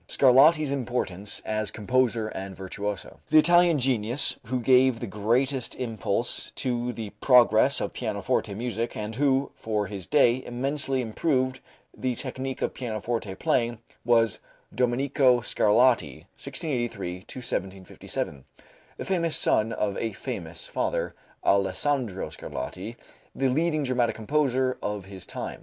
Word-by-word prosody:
Scarlatti's 140 +3 +5
Importance 120 -7 -2
as 110 -1 -1
Composer 115 0 0
and 95 -2 -6
Virtuoso. 95 +1 -5
The 155 - +5
Italian 175 0 +5
genius 125 -1 +1
who 130 +1 -1
gave 130 0 +4
the 120 - -4
greatest 120 +6 0
impulse 115 -6 -2
to 120 -1 -1
the 110 -4 -6
progress 125 0 +5
of - - -3
pianoforte 105 -1 -1
music 115 +1 -3
and 105 +1 -4
who, 135 +1 +1
for 105 -2 -2
his 95 -2 -6
day, 130 -4 +3
immensely 135 +1 -1
improved 130 +2 0 0.4
the 130 -1 -2
technique 130 +1 -4
of - - -1
pianoforte 110 -4 -3
playing, 120 +3 0 0.3
was 115 -1 +3 0.3
Domenico 130 +1 +2
Scarlatti 110 - +2
(1683 120 - -3
1757), 95 - -4 0.5
the - - -5
famous 170 -4 +1
son 110 +1 +3
of 100 -3 -1
a 115 -2 -2
famous 85 -3 -5
father, - - -2 0.3
Alessandro 100 +3 +1
Scarlatti, 95 - -6 0.4
the 135 -1 +1
leading 155 +3 +1
dramatic 125 -3 +1
composer 130 +1 0
of 105 -2 -3
his 95 -2 -7
time. - - -6
120 Hz, 125 wpm, -26 LUFS, 105-130 Hz, 0.5 s, Scarlatti's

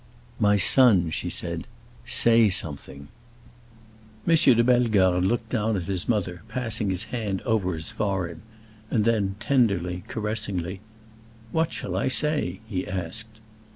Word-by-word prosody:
"My 105 0 +3
son," 100 -6 +5
she - - -3
said, - - -5 0.4
"say 115 -2 +4
something!" 70 -5 -4 1.2
M. 165 - +5
de 130 -7 +5
Bellegarde 110 -8 +3
looked 115 0 -2
down 110 -3 0
at 90 - -3
his 95 +1 -3
mother, 95 -6 -1
passing 115 -3 0
his 95 +2 +2
hand 105 -5 -2
over 100 -7 0
his 80 0 -4
forehead, 95 -6 -3 0.5
and 110 -3 +1
then, 105 -4 +1
tenderly, 95 -10 0
caressingly, 105 -6 -3 0.7
"What 160 0 0
shall 90 - -5
I 95 - 0
say?" 130 - +1
he 95 -4 -4
asked. 110 +5 -5
105 Hz, 130 wpm, -25 LUFS, 90-115 Hz, 1.2 s, son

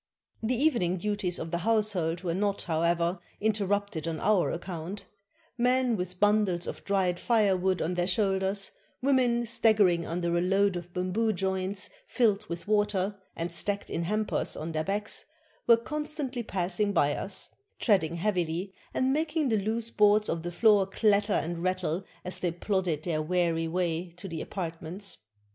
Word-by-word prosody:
The 230 +3 0
evening 235 - +2
duties 200 -2 -1
of 165 - -5
the 170 - 0
household 190 -5 +1
were 170 -2 -1
not, 200 +2 0
however, 170 +2 +1 0.2
interrupted 200 -5 0
on 160 -1 -2
our 205 -2 +3
account; 175 +2 -6 0.5
men 250 0 +3
with 180 -1 -4
bundles 205 -4 +3
of - - -6
dried 190 -3 +1
firewood 190 -5 +2
on 170 - -1
their 175 0 0
shoulders, 195 0 +1 0.3
women 250 -3 +3
staggering 205 -7 +3
under 170 0 -1
a 170 - +2
load 195 +1 +2
of 175 0 -6
bamboo 185 +5 0
joints 190 +1 -2 0.2
filled 215 -4 +2
with 170 +3 -6
water, 205 -2 +1 0.2
and 170 0 -3
stacked 200 +3 -1
in 170 - -1
hampers 215 +3 -1
on 160 +2 -4
their 155 -1 -1
backs, 205 +4 -1 0.4
were 235 -1 +8
con 300 +6 -3
stantly 270 -6 -3
passing 190 +2 0
by 145 -5 +3
us, 195 - -4 0.3
treading 175 -8 +2
heavily, 180 0 -1 0.2
and 260 +1 +2
making 310 -1 0
the 220 - +2
loose 225 +3 -1
boards 210 0 +4
of 165 - -1
the 175 +1 -4
floor 205 0 +4
clatter 205 +1 +2
and 170 +1 -1
rattle 185 -1 -1 0.2
as 180 0 -3
they 180 - 0
plodded 175 -3 -1
their 160 -3 -1
weary 165 0 +1
way 170 0 -1
to 185 - -8
their 165 -3 -5
apartments. 180 +2 -4
190 Hz, 160 wpm, -29 LUFS, 175-210 Hz, 0.5 s, were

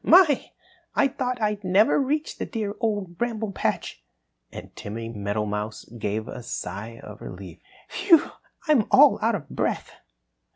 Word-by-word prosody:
My! 330 -5 +6 0.5
I 275 - +4
thought 255 -2 -2
I'd 210 -2 -1
never 195 +8 +4
reach 295 +3 -1
the - - -1
dear 215 -5 -3
Old 205 -7 -2
Bramble 225 -3 -1
Patch!" - - -2 0.5
And - - -10
Timmy 115 +2 -6
Meadowmouse 105 0 -3
gave 110 +2 -2
a 125 - -7
sigh 110 +1 -6
of 105 0 -10
relief. 90 -2 -9 0.3
"Whew! 355 -6 +4 0.4
I'm 280 -9 +4
all 285 +1 +7
out 225 0 +2
of 150 -8 -6
breath!" - - -2
200 Hz, 140 wpm, -25 LUFS, -, 0.5 s, all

